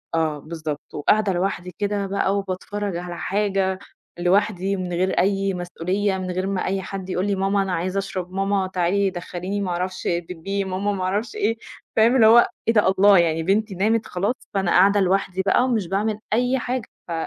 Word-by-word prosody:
آه 155 -2 0
بالضبط، 155 -1 -6
وقاعدة 200 +6 +2
لوحدي 180 -1 -2
كده 205 -1 -1
بقى 195 0 0
وباتفرّج 200 0 -3
على 175 0 -6
حاجة 195 -2 0 0.4
لوحدي 195 +1 +1
من 185 -2 -4
غير 185 +2 +1
أي 195 0 +1
مسئولية 185 +3 -2
من 185 -1 -4
غير 185 +1 -2
ما 195 -1 -1
أي 190 0 -1
حد 190 0 -6
يقول 185 +2 -1
لي 200 - +1
ماما 195 +1 +1
أنا 190 -2 -2
عايز 185 +3 -2
أشرب، 185 -2 -3
ماما 195 0 0
تعالي 190 +2 +1
دخليني 185 +2 -4
ما 190 - -2
أعرفش 185 +2 -3
بيبّي، 180 +3 -2
ماما 190 +2 -2
ما 185 -2 -3
أعرفش 205 - -2
إيه، 400 - 0 0.4
فاهم 230 +3 +5
اللي 225 -4 +6
هو 235 +2 +7 0.2
إيه 230 - +4
ده 210 -3 +4
الله 195 +1 +6
يعني 165 -1 +2
بنتي 200 +2 0
نامت 215 +4 +1
خلاص، 200 +7 -1 0.2
فأنا 195 -3 0
قاعدة 200 +3 +5
لوحدي 190 0 +1
بقى 200 +5 +4
ومش 230 -8 0
باعمل 210 +3 -1
أي 250 +3 +2
حاجة 250 -1 -3 0.2
ف 175 - -7
195 Hz, 190 wpm, -23 LUFS, 180-205 Hz, 0.4 s, هو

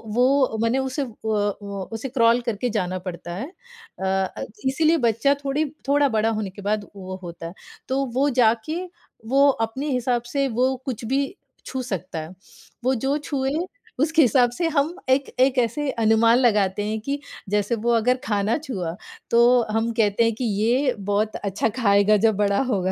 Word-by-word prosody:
वो 255 -2 +3
मने 230 +3 +2
उसे, 265 +2 -2
उ 250 - -6 0.2
उ 205 -2 -2
उसे 235 +4 -4
क्रॉल 235 -1 +4
करके 235 0 -2
जाना 185 -4 -1
पड़ता 175 -1 -7
है। 265 - -6 0.5
अ 190 - -3
अ, 190 0 -1 0.2
इसीलिए 315 +5 +3
बच्चा 235 +3 +2
थोड़ी 285 +3 0 0.2
थोड़ा 285 0 +4
बड़ा 220 0 +1
होने 215 -3 -2
के 200 - -11
बाद 205 0 -1
वो 185 -1 -7
होता 170 -1 -7
है। 170 - -9 0.3
तो 270 +1 0
वो 280 +2 +3
जाके, 235 +8 +2 0.5
वो 275 +4 +4 0.2
अपने 270 +6 -5
हिसाब 250 -1 0
से, 275 -1 +1
वो 255 +2 +1
कुछ 245 -3 -4
भी 275 - -1 0.3
छू 260 -1 -4
सकता 185 -7 -4
है। 155 +1 -7 0.5
वो 260 +1 +2
जो 280 +2 +2
छुए, 275 -2 -2 0.5
उसके 320 +2 +3
हिसाब 245 -1 +4
से 340 -1 0
हम 305 +2 +1 0.2
एक 270 +1 +2
एक 260 0 +3
ऐसी 250 +5 0
अनुमान 225 +2 +5
लगाते 205 -5 +2
हैं 220 0 -2
कि 280 +4 -3 0.3
जैसे 210 +2 +1
वो 235 +2 0
अगर 245 +3 +2
खाना 210 +3 +1
छुआ, 185 - -4 0.4
तो 240 +1 +5
हम 225 +1 0
कहते 220 0 +2
हैं 230 -1 +2
कि 250 - -4 0.2
ये 255 +4 +2
बहुत 205 +2 -1
अच्छा 200 +2 -1
खाएगा 205 -1 +4
जब 220 -2 +3
बड़ा 200 +1 +2
होगा। 190 -2 0
230 Hz, 180 wpm, -23 LUFS, 205-265 Hz, 0.5 s, अनुमान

